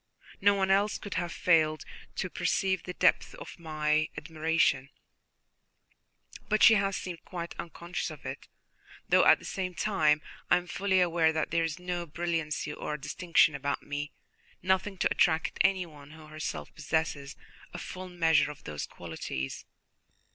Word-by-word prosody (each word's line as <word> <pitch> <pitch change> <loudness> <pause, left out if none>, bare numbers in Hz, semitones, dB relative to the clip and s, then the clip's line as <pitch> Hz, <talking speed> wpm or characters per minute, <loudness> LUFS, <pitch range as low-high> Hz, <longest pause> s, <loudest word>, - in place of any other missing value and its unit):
No 200 +1 +5
one 190 -1 +1
else 205 +2 +3
could 205 - -7
have 175 -1 -2
failed 155 -3 +2 0.3
to - - -2
perceive 190 -2 0
the 180 - -7
depth - - +2
of - - -10
my 155 -1 0
admiration, 155 -2 +1 1.6
but 215 0 +3
she 225 - +10
has 195 -2 +1
seemed 175 -2 -6
quite 170 -2 -6
unconscious 170 +2 -4
of - - -11
it, - - -6 0.6
though - - +5
at - - +8
the - - -14
same 185 -2 -3
time 155 -5 +2 0.3
I - - +6
am 180 - -4
fully 190 +1 +1
aware 170 -2 +3
that 155 -1 -2
there 165 0 +2
is 165 0 -2
no 180 -1 -4
brilliancy 165 -2 -2
or 150 - -4
distinction 155 +2 +2
about 140 0 -2
me, 145 0 -4 0.5
nothing 190 +2 +1
to - - +1
attract 160 -1 +2
anyone 170 -7 0
who 155 +1 -13
herself 155 0 -6
possesses 155 -3 -2 0.4
a - - -7
full 185 0 -7
measure 165 -4 +3
of 145 -2 -10
those 75 -1 -5
qualities." 65 +1 -6
165 Hz, 155 wpm, -29 LUFS, 155-185 Hz, 1.6 s, she